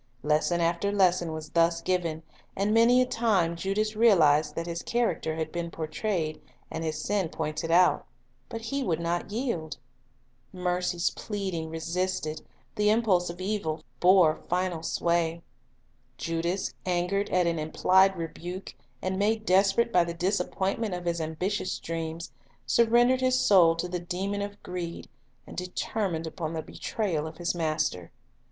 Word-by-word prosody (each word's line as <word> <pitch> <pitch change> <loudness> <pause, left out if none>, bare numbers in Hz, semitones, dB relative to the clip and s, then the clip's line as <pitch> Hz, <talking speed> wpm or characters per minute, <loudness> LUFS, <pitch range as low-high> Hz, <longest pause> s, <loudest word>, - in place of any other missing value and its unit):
Lesson 155 +4 +2
after 170 +4 +1
lesson 185 -4 +2
was 155 -1 -7
thus 170 0 +3
given, 170 -3 -1 0.3
and 200 +2 +1
many 240 +3 +6
a - - -1
time 205 -9 +1
Judas 205 +5 -1
realized 155 -9 +4
that 165 - -3
his 170 -1 -4
character 235 -9 -1
had 160 -1 -3
been 170 -1 -3
portrayed, 160 0 -3 0.3
and 160 - -4
his 155 -1 -2
sin 195 0 0
pointed 155 +1 -3
out; 180 +2 +4 0.4
but 225 - -5
he 275 +5 -2
would 170 -11 0
not 170 +3 -2
yield. 205 - -3 0.7
Mercy's 180 -1 0
pleading 190 -7 -4
resisted, 165 -1 -2 0.3
the 210 0 +2
impulse 210 -6 +2
of 170 +1 -7
evil 185 -6 -2 0.2
bore 180 -4 +5
final 180 -2 0
sway. 170 0 0 0.7
Judas, 170 +3 -2
angered 180 +3 0
at 180 -1 +2
an 170 -1 0
implied 190 +5 +3
rebuke, 175 +3 -6 0.3
and 190 0 -1
made 215 +2 +1
desperate 195 +5 +3
by 180 - +5
the 170 0 -5
disappointment 195 +2 -1
of 180 0 -7
his 170 -1 -1
ambitious 180 +5 -2
dreams, 165 0 -5 0.3
surrendered 240 +2 +4
his 255 0 +3
soul 170 -5 +5
to 165 +2 -3
the 180 0 -3
demon 190 +4 -3
of 205 0 -6
greed, 175 -2 -5 0.4
and - - -11
determined 180 -1 -2
upon 160 0 -4
the 160 -1 -3
betrayal 170 -9 -2
of 160 0 -10
his 175 0 -1
Master. 155 - -1
175 Hz, 145 wpm, -28 LUFS, 165-200 Hz, 0.7 s, many